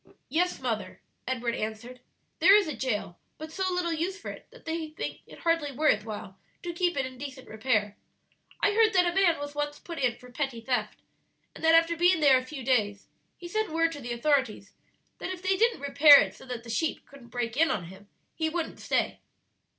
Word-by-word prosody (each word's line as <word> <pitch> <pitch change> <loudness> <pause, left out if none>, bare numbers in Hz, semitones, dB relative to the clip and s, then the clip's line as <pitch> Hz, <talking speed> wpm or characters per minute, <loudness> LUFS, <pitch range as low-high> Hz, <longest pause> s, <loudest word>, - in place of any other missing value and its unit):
"Yes, 350 +6 0
mother," 220 -7 -3 0.3
Edward 245 -2 -1
answered; 225 +3 -5 0.4
"there 390 - +8
is 415 -4 +4
a 305 - -4
jail, 215 -8 -3 0.2
but 315 +1 -8
so 375 +1 -1
little 355 -2 0
use 360 +5 -2
for - - -6
it - - -12
that - - -18
they 320 0 -3
think 310 - -6
it - - -14
hardly 330 -4 +1
worth 255 -7 +2
while 205 -3 -8 0.2
to 345 -1 -4
keep 350 -1 0
it 270 - +1
in 255 -1 -9
decent 270 -2 -8
repair. 215 -2 -1 0.6
I 410 - +4
heard 440 0 +4
that 365 -1 +4
a 345 - 0
man 370 -3 +3
was 290 0 -6
once 290 0 -3
put 335 -2 -8
in 250 -3 +1
for 250 0 -15
petty 270 -2 -3
theft, 250 +2 -2 0.5
and - - -12
that 325 0 +6
after 330 +1 +4
being 350 +1 +4
there 275 -4 +6
a - - -8
few 265 0 -8
days 210 -6 0 0.3
he 350 - -9
sent 435 +3 -1
word 330 +1 +1
to 290 -3 -8
the 240 -1 -6
authorities 240 -5 0 0.5
that - - -4
if 370 0 -6
they 380 0 +2
didn't 460 - +2
repair 285 +1 +8
it - - 0
so - - -15
that 245 -2 -5
the 230 - -7
sheep 320 +7 -1
couldn't 275 -4 -15
break 235 -1 -3
in 320 +3 +3
on 190 - -1
him, 190 +4 -13 0.3
he 320 -1 -1
wouldn't 330 0 -4
stay." - - -1
290 Hz, 215 wpm, -28 LUFS, 240-335 Hz, 0.6 s, there